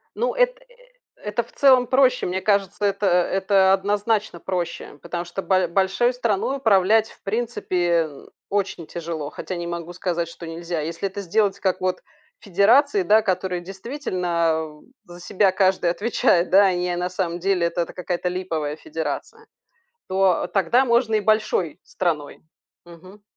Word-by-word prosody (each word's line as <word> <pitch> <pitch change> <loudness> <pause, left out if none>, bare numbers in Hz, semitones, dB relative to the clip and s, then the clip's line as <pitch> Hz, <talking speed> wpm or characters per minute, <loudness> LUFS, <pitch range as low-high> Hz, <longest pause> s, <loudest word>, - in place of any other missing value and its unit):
Ну - - -1
эт - - +2
э - - -21
э - - -23 0.4
это 210 +3 -2
в - - -20
целом 260 -3 +5
проще. 255 -1 +3
Мне 185 +1 -2
кажется, 200 -1 0
это 200 0 0
это 190 +2 +3
однозначно 205 -1 0
проще, 175 -5 -4
потому 175 0 -5
что 175 +3 -5
бо 185 -2 +2
большой 195 +7 +1
страной 240 +2 -1
управлять, 220 -1 +3
в - - -20
принципе, 180 -7 0 0.4
очень 195 -4 -2
тяжело, 165 -3 -5
хотя 185 - -6
не 175 0 -4
могу 170 0 -5
сказать, 170 -2 -2
что 170 0 -10
нельзя. 165 0 -4
Если 165 +5 -3
это 200 +1 -6
сделать 200 +1 0
как 190 -2 0
вот 185 0 -1 0.4
федерации, 205 - +3
да, 215 +5 +5
которые 185 -2 -2
действительно, 175 - -2 0.2
э, 175 - -13
за 175 - -11
себя 195 +1 +2
каждый 190 -3 +2
отвечает, 185 -4 +1
да, 200 +1 +6
а 185 - +3
не 180 0 -1
на 180 +1 -2
самом 175 -2 -3
деле 180 -2 +1
это 170 0 -2
какая-то 180 0 -4
липовая 165 -5 -3
федерация, 440 - -6 0.6
то 190 -2 +2
тогда 235 +7 +2
можно 235 -2 +2
и - - +1
большой 205 -6 0
страной. 160 -5 -3 0.5
Мгм. 185 +4 -15
190 Hz, 155 wpm, -22 LUFS, 175-210 Hz, 0.6 s, да